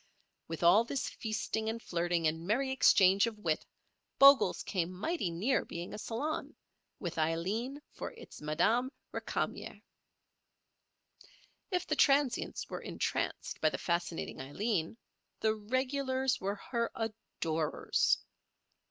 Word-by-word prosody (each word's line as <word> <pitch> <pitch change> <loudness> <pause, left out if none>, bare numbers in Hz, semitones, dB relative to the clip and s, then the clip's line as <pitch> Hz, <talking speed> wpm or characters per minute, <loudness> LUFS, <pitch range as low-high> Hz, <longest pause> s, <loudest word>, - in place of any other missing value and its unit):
With 165 +1 -5
all 180 +7 +7
this 265 +3 -2
feasting 220 0 -2
and 225 +1 -3
flirting 175 -4 -1
and 160 +1 +1
merry 265 +6 +1
exchange 195 -6 +5
of 225 -2 -5
wit 165 -7 -1 0.5
Bogle's 275 0 +7
came 180 -3 -1
mighty 200 - -2
near 200 +11 +1
being 170 +1 -6
a - - -6
salon, 290 +9 -3 0.4
with 175 -4 -4
Aileen 195 - -1
for - - -6
its - - -12
Madame 220 +12 +2 0.2
Récamier. - - -3 1.9
If 360 -3 0
the - - 0
transients 275 -3 +2
were - - -5
entranced - - -3
by 155 - +5
the - - -4
fascinating 170 -4 -2
Aileen, 180 - -2 0.4
the 220 0 +2
regulars 260 +4 0
were 200 +2 -1
her 235 +3 -2
adorers. 165 -8 0
215 Hz, 120 wpm, -32 LUFS, 170-255 Hz, 1.9 s, all